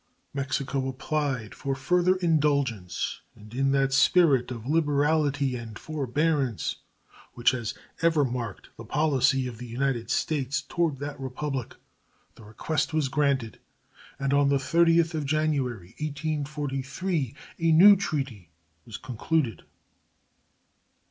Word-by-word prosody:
Mexico 135 -1 -2
applied 135 -4 -2
for 135 -1 -3
further 180 +6 +2
indulgence, 140 - 0
and, 105 +1 -14
in 135 +2 +1
that 135 -1 +2
spirit 135 -3 +4
of 120 -3 -7
liberality 145 -2 +1
and 115 -3 -7
forbearance 145 -3 -1 0.6
which 120 - +3
has 120 -4 -4 0.3
ever 165 -3 +3
marked 120 -5 -5
the - - -8
policy 135 -3 +2
of 120 -3 -6
the 125 - -7
United 120 -1 -1
States 140 -3 0
toward 165 -5 -1
that 145 +1 -6
Republic, 135 -1 -4 0.6
the - - -16
request 155 +9 -2
was 150 -4 +1
granted, 140 -6 0 0.6
and 140 0 -1
on 140 0 +4
the 140 - +3
30th 165 +3 +3
of 155 -2 -2
January, 135 - -1
1843, 145 0 -3 0.2
a 165 0 +3
new 195 +6 +9
treaty 135 - -3 0.4
was 110 - -6
concluded. 125 - -2
140 Hz, 120 wpm, -27 LUFS, 125-155 Hz, 0.6 s, new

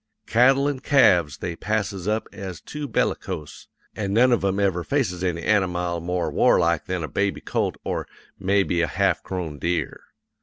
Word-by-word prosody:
Cattle 135 +4 +4
an' 145 -2 -2
calves 90 - +4
they 85 -2 -4
passes 105 -2 -2
up 110 +1 0
as 95 -4 -7
too 150 -1 -6
bellicose, 90 - -3 0.3
an' 100 -2 -2
none 125 +4 +5
of 120 - +2
'em 95 0 +1
ever 95 -3 +1
faces 95 -10 -1
any 85 -2 -1
anamile 90 -4 +1
more 90 +1 -2
warlike 85 -2 +3
than 90 -2 -3
a - - -3
baby 100 +3 -1
colt - - -1
or - - -3 0.3
mebby 95 -2 +1
a 85 - +1
half 95 -2 +1
grown 85 -6 -5
deer. 85 -4 -2
95 Hz, 165 wpm, -24 LUFS, 85-110 Hz, 0.3 s, none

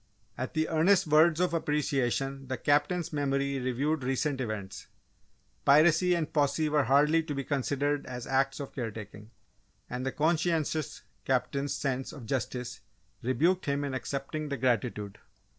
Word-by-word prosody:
At 130 +5 -5
the 155 0 +1
earnest 180 +4 +3
words 155 +2 +4
of 180 -1 +1
appreciation 135 -3 -1
the 130 0 -3
Captain's 155 +4 +1
memory 140 -1 0
reviewed 135 +4 -1
recent 135 +1 -1
events 105 -5 -5 0.8
piracy 160 +5 +5
and 160 -3 -2
posse 150 +1 +2
were 150 -2 +2
hardly 150 +5 +4
to 155 -2 -5
be 140 - -2
considered 145 +1 -1
as 125 -1 -6
acts 135 +1 +1
of 140 - -6
care 120 -4 -3
taking, 105 0 -10 0.6
and 125 +1 -4
the 135 - -1
conscientious 160 -1 0 0.2
Captain's 140 +2 0
sense 135 -2 -2
of 135 -6 -9
justice 125 0 -3 0.4
rebuked 165 +9 +1
him 140 0 0
in 140 -2 -3
accepting 140 +3 -4
the 140 - -2
gratitude. 115 -5 -1
140 Hz, 145 wpm, -29 LUFS, 130-155 Hz, 0.8 s, piracy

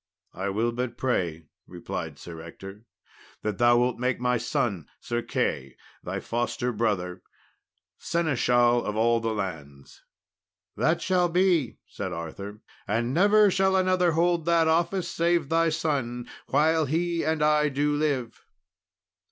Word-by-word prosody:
"I 95 +2 -3
will 110 +4 0
but 120 0 -4
pray," 85 -11 -1 0.2
replied 80 -3 -6
Sir 85 0 -9
Ector, 95 +6 -11 0.6
"that 105 -2 -3
thou 120 0 +5
wilt 125 0 +1
make 125 0 0
my 125 -1 +1
son 100 - -2
Sir 120 0 -3
Key, 65 - -2 0.3
thy - - -4
foster 120 +1 -2
brother, 95 -5 -1 0.8
seneschal 120 -7 +2
of 105 - -3
all 115 +1 +3
the 115 0 -2
lands." 75 -9 -7 0.7
"That - - +1
shall 180 -1 +2
he 170 - -10
be," 175 - +2
said 95 -3 -6
Arthur; 100 +6 -7 0.3
"and 115 +4 0
never 205 +4 +5
shall 190 +1 +2
another 185 -2 +2
hold 170 0 +1
that 165 -1 +3
office, 170 +3 +1
save 170 -3 0
thy 165 0 +3
son, 140 -7 -2 0.2
while 155 +2 +2
he 170 +3 0
and 160 -1 0
I 150 0 +3
do 145 +2 0
live." 145 -6 -2
125 Hz, 140 wpm, -26 LUFS, 105-165 Hz, 0.8 s, thou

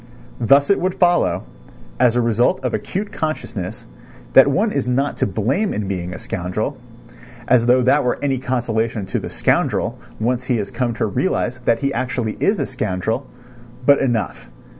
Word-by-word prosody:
Thus 140 - +4
it 200 - +3
would 185 +1 -1
follow, 175 -1 +2 0.6
as 120 -1 +4
the 120 - +3
result 120 +3 +1
of 125 - -1
acute 205 +2 -3
consciousness, 135 - -4 0.5
that 135 - +8
one 205 +10 +1
is 140 -7 -1
not 135 +3 0
to - - +1
blame 125 - 0
in 105 -1 -2
being 90 -2 -3
a 90 - -6
scoundrel; 95 +10 -3 0.7
as 120 -1 +4
though 125 +1 +5
that 140 +4 +4
were 125 - 0
any 135 -3 0
consolation 115 -4 -1
to 95 - -2
the - - -6
scoundrel - - 0 0.2
once 125 +3 0
he 125 -2 +1
has 105 - -3
come 120 -3 -1
to - - 0
realise 125 - -1
that 115 - +2
he 140 0 0
actually 125 -3 -2
is 205 - +2
a 140 - -1
scoundrel. 110 +1 -2 0.6
But 140 +1 +6
enough.... 120 - -1
125 Hz, 175 wpm, -20 LUFS, 110-140 Hz, 0.7 s, that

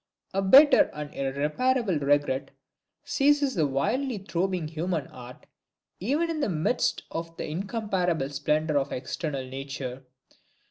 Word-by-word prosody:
A 195 - +1
bitter 270 +10 +7
and 150 -1 -6
irreparable 155 - 0
regret 145 -1 +1 0.5
seizes 285 -1 +2
the 160 -6 +1
wildly 235 - -1
throbbing 185 -3 -2
human 160 -1 -2
heart, 125 -1 -12 0.5
even 285 - 0
in 320 - -3
the 285 - 0
midst 180 +8 0
of 165 0 -5
the - - -4
incomparable 180 - -1
splendor 150 +1 +1
of 135 0 -3
external 135 +1 -4
nature. 135 -1 -6
160 Hz, 125 wpm, -27 LUFS, 140-205 Hz, 0.5 s, bitter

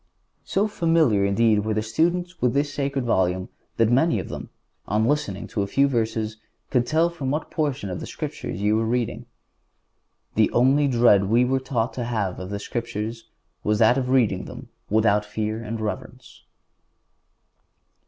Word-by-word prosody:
So 200 +3 +1
familiar, 165 - +2
indeed, 105 +2 +3
were 110 0 -1
the 110 - 0
students 175 +9 -1
with 125 +1 +2
the 140 - +4
sacred 140 -2 -2
Volume 95 -4 +1 0.3
that 115 0 +3
many 130 0 +3
of 95 - -5
them, - - -7 0.4
on 105 +2 +1
listening 115 -8 -1
to 105 - -2
a 100 - -1
few 140 +7 +3
verses, 110 -3 -1 0.3
could 120 -3 +2
tell 165 +2 +2
from 145 -6 -4
what 150 +3 -2
portion 145 -9 -1
of 90 -2 -4
the - - -7
Scriptures 90 - -5
you 105 +1 +3
were 115 - 0
reading. 120 0 -2 1.1
The 110 -1 +3
only 135 +4 +4
dread 115 -6 +4
we 115 +5 +3
were 130 +1 +1
taught 130 -3 -2
to 125 - -3
have 110 -6 -2
of 95 0 -6
the 100 - -3
Scriptures 115 +1 -5 0.3
was 105 0 +1
that 110 +3 +5
of 125 -1 -3
reading 120 -8 +2
them - - -10 0.2
without 105 -1 +3
fear 110 +1 -3
and 115 0 -5
reverence. 125 +4 -6
115 Hz, 170 wpm, -24 LUFS, 105-135 Hz, 1.1 s, that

